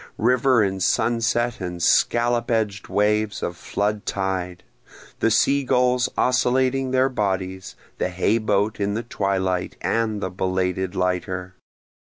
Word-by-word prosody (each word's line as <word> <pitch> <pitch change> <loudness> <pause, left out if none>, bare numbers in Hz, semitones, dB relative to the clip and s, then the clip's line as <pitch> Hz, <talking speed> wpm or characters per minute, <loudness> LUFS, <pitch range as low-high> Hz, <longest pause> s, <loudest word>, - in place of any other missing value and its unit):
River 125 +1 +3
and 95 -1 -2
sunset 120 +3 +1
and 90 -1 -5
scallop 120 +4 +2
edg'd 105 -4 -1
waves 105 0 0
of 85 - -3
flood 105 +4 -2
tide? 95 -2 -3 0.6
The 115 - +2
sea 140 +5 +3
gulls 125 0 +2
oscillating 130 +1 +2
their 130 +1 +3
bodies, 95 -6 -3 0.2
the - - 0
hay 95 +5 +1
boat 105 0 0
in 100 0 -1
the 115 - -2
twilight, 95 -5 -1
and 110 -2 0
the 95 -2 -3
belated 95 0 -1
lighter? 90 0 -2
105 Hz, 130 wpm, -23 LUFS, 95-120 Hz, 0.6 s, River